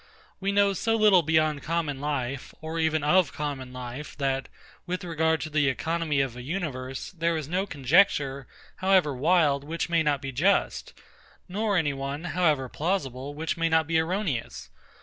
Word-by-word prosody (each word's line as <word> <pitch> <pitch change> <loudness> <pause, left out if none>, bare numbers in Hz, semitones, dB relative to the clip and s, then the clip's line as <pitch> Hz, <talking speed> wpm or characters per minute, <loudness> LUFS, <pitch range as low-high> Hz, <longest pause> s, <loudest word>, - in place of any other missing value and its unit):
We 195 +1 0
know 200 0 +3
so 225 +4 0
little 210 -5 +6
beyond 155 -2 +1
common 155 -2 -2
life, 140 -3 -3
or 160 +1 -4
even 160 -2 +1
of 180 +3 +4
common 140 -4 -4
life, 125 +3 -7
that, 135 -1 -1 0.4
with 180 +1 -3
regard 160 -2 0
to 155 - -5
the 150 -1 +2
economy 160 +1 0
of 130 -3 -2
a 125 - -7
universe, 135 -4 -4
there 170 -2 0
is 155 -3 -4
no 185 +5 -1
conjecture, 140 -2 +2 0.3
however 185 -6 +3
wild, 145 0 +2
which 165 +4 -3
may 170 -1 +3
not 150 -2 +1
be 135 0 -5
just; 170 +10 +1 0.5
nor 205 +1 0
any 150 -4 +1
one, 140 +3 -4
however 165 -7 +1
plausible, 145 -4 -3
which 160 +2 -2
may 165 0 +1
not 160 -1 +3
be 160 +1 +2
erroneous. 165 - -3
155 Hz, 170 wpm, -27 LUFS, 140-175 Hz, 0.5 s, little